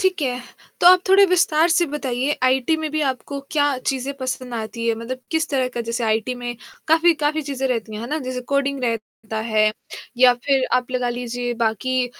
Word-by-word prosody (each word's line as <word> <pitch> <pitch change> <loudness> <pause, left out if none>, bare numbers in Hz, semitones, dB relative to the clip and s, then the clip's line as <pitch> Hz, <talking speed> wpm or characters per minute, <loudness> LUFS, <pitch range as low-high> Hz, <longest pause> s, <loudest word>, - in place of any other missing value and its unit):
ठीक 375 -3 +1
है, 250 -2 -1 0.4
तो - - +4
आप 365 0 +8
थोड़े 390 +1 +7
विस्तार 340 -3 +3
से 340 +1 +3
बताइए 275 -2 -2
आईटी 260 +4 +2
में 315 -1 -3
भी 310 +1 -1
आपको 275 +2 -6
क्या 290 -2 +2
चीज़ें 265 +1 -2
पसंद 255 -1 -4
आती 230 +1 -4
है? 230 - +2
मतलब 235 +3 -6
किस 320 0 0
तरह 260 -3 +1
का 240 - -2
जैसे 235 +1 -2
आईटी 220 +3 0
में 245 -1 -5 0.3
काफ़ी 325 +2 +5
काफ़ी 305 +1 -1
चीज़ें 275 -2 -3
रहती 225 -3 -2
हैं, 210 - -5
है - - -5
ना? 310 - -1
जैसे 255 -3 -4
कोडिंग 280 -1 0
रहता 220 -1 -4
है 215 0 +4 0.5
या 250 0 +7
फिर 265 +2 +1
आप 250 0 -2
लगा 250 -1 -1
लीजिए 245 0 -3
बाकी 250 +3 0
255 Hz, 200 wpm, -21 LUFS, 240-295 Hz, 0.5 s, आप